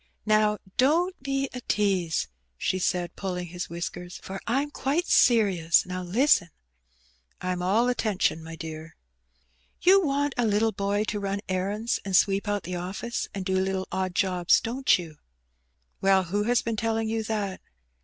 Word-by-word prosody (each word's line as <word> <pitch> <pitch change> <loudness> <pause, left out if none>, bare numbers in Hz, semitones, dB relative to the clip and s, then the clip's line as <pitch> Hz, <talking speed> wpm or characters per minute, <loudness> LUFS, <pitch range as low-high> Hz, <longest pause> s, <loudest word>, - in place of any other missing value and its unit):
"Now, 215 0 +3 0.2
don^t 325 +8 +4
be 275 0 -1
a 250 - -6
tease," 190 -8 0 0.3
she 185 - -1
said, 180 -1 -1
pulling 180 -3 -4
his 175 +1 -5
whiskersi, 175 +1 -6
"for 195 0 -6
Fm 275 +5 0
quite 295 +6 0
serious. 195 - +4
Now 185 0 -4
listen." 195 - +3 0.9
"I'm 180 0 -2
all 210 +7 +2
attention, 215 -9 0
my 165 0 -8
dear." 160 0 -8 0.4
" - - -40
You 385 +2 +6
want 285 -1 0
a 240 -2 +2
little 215 +2 +2
boy 200 +1 0
to 210 -1 -3
run 200 0 -2
errands 200 +5 -1
and 195 -2 -1
sweep 200 +2 +3
out 205 -1 -1
the 180 - -6
office^ 190 +6 -4
and 195 -2 -4
do 190 - -1
little 190 0 -1
odd 185 -1 -2
jobs, 180 -2 +3
don't 255 +4 +2
you? 165 -4 -9 0.4
" - - -46
"Well, 195 -1 +4
who 205 +4 -1
has 240 +1 +2
been 230 -1 -2
telling 225 0 0
you 225 0 -1
that?' 205 -4 -3
195 Hz, 165 wpm, -26 LUFS, 180-225 Hz, 0.9 s, You